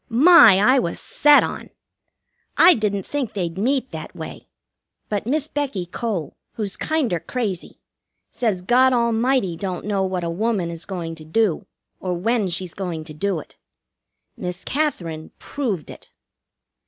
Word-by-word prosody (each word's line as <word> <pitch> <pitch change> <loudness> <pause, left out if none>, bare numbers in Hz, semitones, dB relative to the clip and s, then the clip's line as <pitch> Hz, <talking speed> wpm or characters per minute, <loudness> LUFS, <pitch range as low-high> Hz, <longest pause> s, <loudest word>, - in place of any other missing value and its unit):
My, 250 - +8
I 255 +7 +5
was 170 -9 -2
set 295 0 +5
on! - - -5 0.9
I 365 - +8
didn't 200 -3 -1
think 285 -5 -3
they'd 175 -4 -3
meet 260 +7 0
that - - -8
way; - - -8 0.6
but 210 +1 -2
Miss 295 +3 0
Becky 275 -12 -3
Cole, 180 - -4 0.2
who's 205 -3 -3
kinder 275 - -1
crazy, 210 -7 -4 0.5
says 210 -7 -1
God 255 +5 +4
Almighty 235 -4 +1
don't 185 +1 -4
know 205 -2 0
what 185 -2 -1
a 170 - -2
woman 195 -2 -1
is 165 0 -6
going 175 -4 -5
to 160 -1 -11
do 175 +3 0 0.3
or 180 -1 -2
when 215 +2 0
she's 180 0 -3
going 175 -5 -4
to 155 -1 -9
do 190 +4 -1
it. - - -14 0.8
Miss 180 0 -6
Katherine 175 - -2
proved 215 - -4
it. - - -14
200 Hz, 150 wpm, -22 LUFS, 175-250 Hz, 0.9 s, My